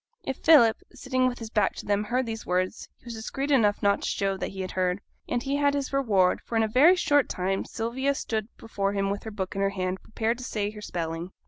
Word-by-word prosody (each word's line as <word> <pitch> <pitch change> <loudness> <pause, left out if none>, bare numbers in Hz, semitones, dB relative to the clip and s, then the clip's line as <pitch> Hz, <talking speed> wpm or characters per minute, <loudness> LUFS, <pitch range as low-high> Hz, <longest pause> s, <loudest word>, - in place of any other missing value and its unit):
If 265 - -3
Philip, 275 -9 +5
sitting 255 -1 0
with 245 -1 -2
his 225 -1 -8
back 210 -3 +1
to - - -8
them, 205 +1 +1
heard 250 +3 0
these 225 -1 -5
words 185 +3 -2
he - - -30
was 235 - -6
discreet 270 +6 -4
enough 210 -7 +3
not 200 0 +3
to - - -3
show 195 -1 0
that - - -3
he 190 -1 -5
heard. 185 0 -1 0.3
And 245 0 -1
he 280 +1 -1
had 285 0 +2
his 280 -1 -3
reward; 205 -9 +2
for 235 - -6
in 225 - +4
a - - +1
very 285 +11 +6
short 290 -6 +2
time, 190 +1 -1
Sylvia 260 +5 -1
stood 220 -5 -2
before 200 -3 -2
him 195 -1 0
with 200 - -3
her - - -4
book 190 -3 -4
in 195 - -1
her 195 - +3
hand, 185 -1 -3
prepared 225 +2 -2
to - - -7
say 210 -4 -2
her 210 -1 -10
spelling. 170 -1 -4
220 Hz, 245 wpm, -27 LUFS, 195-255 Hz, 0.3 s, very